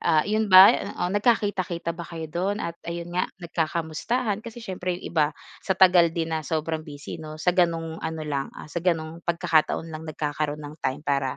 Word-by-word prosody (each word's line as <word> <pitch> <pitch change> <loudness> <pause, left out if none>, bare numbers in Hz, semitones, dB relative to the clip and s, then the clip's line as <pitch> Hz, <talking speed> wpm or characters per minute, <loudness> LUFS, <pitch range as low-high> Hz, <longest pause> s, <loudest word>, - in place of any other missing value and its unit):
ah, 155 -2 +3
'yon 215 +1 0
ba, 190 +1 +10 0.3
oo, 180 - -1
nagkakita-kita 200 -6 +1
ba 170 0 -7
kayo 165 -1 -6
do'n 195 +4 -1
at 170 0 -6
ayun 170 0 -5
nga 180 - 0
nagkakamustahan 170 +6 -2
kasi 230 +1 -10
siyempre 180 -3 -3
'yong - - -13
iba 155 -3 +4 0.3
sa 190 - -1
tagal 180 -2 +6
din 165 0 -3
na 160 - 0
sobrang 160 +1 -2
busy 150 -1 -8
'no 155 -1 -8
sa 175 +3 +1
gano'ng 165 -2 0
ano 160 0 -4
lang, 140 -2 -2
ah, 150 - -10
sa 170 - -2
gano'ng 165 -2 -1
pagkakataon 165 -2 +1
lang 160 +1 -7
nagkakaroon 150 0 -3
ng 150 +1 -10
time 130 +3 -2
para 140 -2 0
165 Hz, 190 wpm, -25 LUFS, 155-180 Hz, 0.3 s, ba